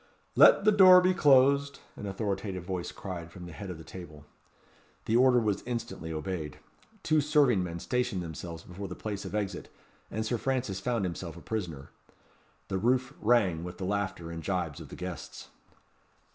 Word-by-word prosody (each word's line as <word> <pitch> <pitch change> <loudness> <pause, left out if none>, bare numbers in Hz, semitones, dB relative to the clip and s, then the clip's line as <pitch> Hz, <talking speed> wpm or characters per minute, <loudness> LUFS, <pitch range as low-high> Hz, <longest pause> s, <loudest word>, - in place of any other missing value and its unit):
"Let 200 - +7
the 215 - +7
door 185 -3 +9
be 185 +1 +3
closed," 140 -3 +4 0.2
an 105 - -6
authoritative 95 -2 -3
voice 90 -1 -4
cried 85 -4 -7
from 90 +1 -10
the 85 - -9
head 100 +4 -8
of 90 - -6
the 80 - -11
table. 75 -4 -11 0.8
The 110 - +1
order 125 0 +5
was 105 -4 0
instantly 115 -9 -4
obeyed. 80 -1 -4 0.5
Two 155 -1 +3
serving 140 - +3
men 85 -1 -5
stationed 110 -2 -1
themselves 85 0 -7
before 95 +3 -7
the 90 - -7
place 105 -2 -5
of - - -5
exit, 105 -3 -3 0.4
and 110 +2 -3
Sir 115 +1 -1
Francis 125 -8 -1
found 115 -1 -1
himself 85 -1 -5
a - - -8
prisoner. 85 -10 -5 0.8
The 95 - -2
roof 125 +5 +1
rang 100 -8 +3
with 90 0 -7
the 95 - -4
laughter 95 -4 -2
and 85 -1 -6
gibes 90 -5 -2
of - - -10
the - - -9
guests. 90 -4 -7
95 Hz, 175 wpm, -29 LUFS, 85-125 Hz, 0.8 s, door